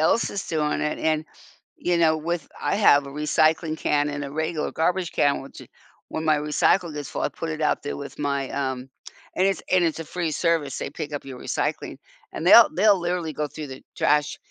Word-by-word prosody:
else 195 +8 +2
is 200 - -4
doing 150 -2 0
it 150 - -1
and, 155 -1 0 0.5
you 175 0 0
know, 160 -2 +4
with 165 0 -3
I - - 0
have 145 -9 +5
a - - -8
recycling 155 +2 +1
can 145 0 +1
and 145 0 -4
a 140 - -7
regular 160 0 -2
garbage 175 +2 0
can, 145 -1 +2
which 135 - -11
it - - -14 0.4
when 160 - -4
my 155 -1 +3
recycle 155 +3 +1
gets 145 -1 -6
full, - - -4
I - - +1
put 160 +3 -6
it 155 0 -4
out 150 - 0
there 145 - -3
with 140 - -9
my, 140 -2 -1
um 130 -1 -3 0.5
and 185 - +3
it's 195 -4 0
and 185 -2 +4
it's 165 -1 -1
a - - -5
free 165 0 -3
service. 160 -4 0
They - - -4
pick 150 +1 -6
up 145 - -5
your 130 -2 -8
recycling, - - -3 0.3
and 160 - -5
they'll 225 +5 +9
they'll 200 0 +4
literally 175 -2 -2
go 150 0 -2
through 150 0 -8
the 130 0 -9 0.2
trash, 150 0 +2
155 Hz, 220 wpm, -24 LUFS, 145-170 Hz, 0.5 s, they'll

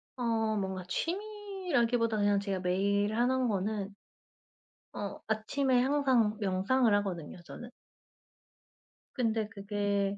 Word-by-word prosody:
어 225 -3 0
뭔가 190 -2 -3
취미라기보단 340 - -1
그냥 205 0 +3
제가 195 -1 -2
매일 200 +3 +1
하는 255 +2 +2
거는 205 -1 -2 1.0
어 200 -1 -5
아침에 245 +4 +1
항상 260 -6 +2
명상을 205 +5 +2
하거든요 180 -5 -3
저는. 240 +7 -9 1.4
근데 225 -4 0
그게 200 -1 -1
220 Hz, 225 characters per minute, -31 LUFS, 200-250 Hz, 1.4 s, 그냥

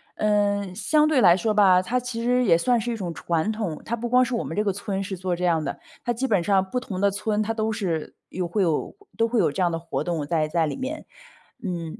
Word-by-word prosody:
嗯， 205 -2 +1
相 305 +8 +3
对 295 -5 +3
来 175 -2 +6
说 215 +3 0
吧， 190 -3 +5
它 235 +7 -1
其 240 -2 -5
实 250 +1 +2
也 165 -7 +5
算 245 +5 +2
是 240 - -3
一 230 - -3
种 175 -4 -4
传 170 +6 -1
统， 205 -8 -4
它 235 - -1
不 235 +1 -4
光 250 +1 +5
是 250 -1 -2
我 - - -1
们 165 - -5
这 210 - +2
个 200 - +1
村 195 0 -3
是 195 0 -4
做 185 0 -2
这 180 +1 -2
样 165 -3 +2
的， - - -4 0.2
它 240 - 0
基 255 +3 -1
本 200 -7 +2
上 190 -1 +2
不 250 - -1
同 195 -7 -6
的 200 0 +3
村 210 +2 -1
它 225 +1 -1
都 220 0 -1
是 175 -7 -3
有 180 -1 -3
会 195 +3 0
有 165 - -1 0.2
都 230 - +3
会 240 - +1
有 - - +3
这 185 - -3
样 175 - +2
的 165 - -2
活 165 0 -3
动 165 -4 -2
在 155 -2 +1
在 165 0 +1
里 150 - -3
面。 275 +4 -5 0.6
嗯， 175 +1 -4
200 Hz, 285 characters per minute, -24 LUFS, 175-230 Hz, 0.6 s, 来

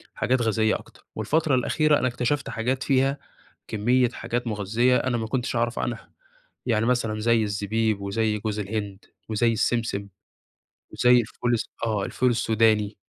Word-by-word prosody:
حاجات 125 0 +1
غذائية 110 -1 +2
أكتر. - - -12
والفترة 155 -3 +1
الأخيرة 150 +4 +2
أنا 130 - +1
اكتشفت 130 +3 -1
حاجات 125 +4 -2
فيها 135 0 +2 0.5
كمية 120 +3 +2
حاجات 120 0 -4
مغذية، 115 +4 +1
أنا 125 -2 0
ما 110 - -3
كنتش 120 +1 -2
أعرف 120 0 0
عنها. 120 -1 -4 0.5
يعني 115 -2 +1
مثلًا 115 -3 0
زي 115 0 +3
الزبيب 105 +1 -1
وزي 105 +2 -1
جوز 105 0 -3
الهند 100 -1 -4 0.2
وزي 115 +2 +2
السمسم، 110 -2 -1 0.9
وزي 125 0 +5
الفول 120 +2 -2
الس 115 - -1 0.2
آه، 105 -3 -1
الفول 125 - +1
السوداني، 110 -3 +2
115 Hz, 145 wpm, -25 LUFS, 110-125 Hz, 0.9 s, وزي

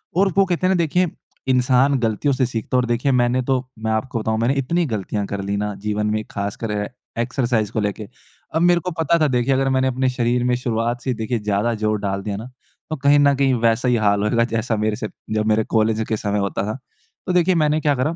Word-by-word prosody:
और 195 +1 +3
वो 195 - +6
कहते 185 0 0
हैं 190 - +3
ना 185 - +1
देखिए 180 +3 +1 0.5
इंसान 130 +2 +3
गलतियों 115 +5 0
से 130 0 +1
सीखता 115 0 -3
है - - +5
और - - -2
देखिए 120 +4 +1
मैंने 120 +1 +1
तो 130 - +3 0.3
मैं - - +1
आपको 115 +2 -1
बताऊँ 110 0 -1
मैंने 120 +4 +2
इतनी 170 +6 0
गलतियाँ 100 0 -3
कर 100 - -2
ली 100 - 0
ना 105 0 -2
जीवन 105 0 0
में 110 - -3
ख़ासकर 100 +2 -4
ए 105 - -3 0.3
एक्सरसाइज़ 120 -3 0
को - - -1
लेके। 105 0 -3 0.5
अब 160 - +2
मेरे 175 0 +4
को 180 - -1
पता 160 +1 +3
था 155 - +3
देखिए 125 +1 +1
अगर 135 0 +1
मैंने 130 0 +2
अपने 130 0 +1
शरीर 120 -1 0
में 125 0 +2
शुरुआत 120 0 -2
से 130 +1 -1
देखिए 115 +1 -1
ज़्यादा 105 +2 0
जोर 105 -1 +1
डाल 100 -1 -2
दिया 100 0 -4
ना 115 +4 -8 0.4
तो 155 - -2
कहीं 140 +1 +6
न 140 0 +5
कहीं 135 -1 +2
वैसा 115 +2 +2
ही 125 - +3
हाल 100 -2 +2
होएगा 115 +2 +2
जैसा 115 0 -1
मेरे 105 0 0
से 110 - -4 0.3
जब 110 0 0
मेरे 110 0 +3
कॉलेज 110 0 +2
के 110 - 0
समय 105 0 -1
होता 100 -1 -1
था। 110 +4 -3 0.5
तो 180 - 0
देखिए 180 0 +3
मैंने 150 0 +2
क्या 145 -2 +2
करा? 150 +6 -1
120 Hz, 240 wpm, -21 LUFS, 110-135 Hz, 0.5 s, वो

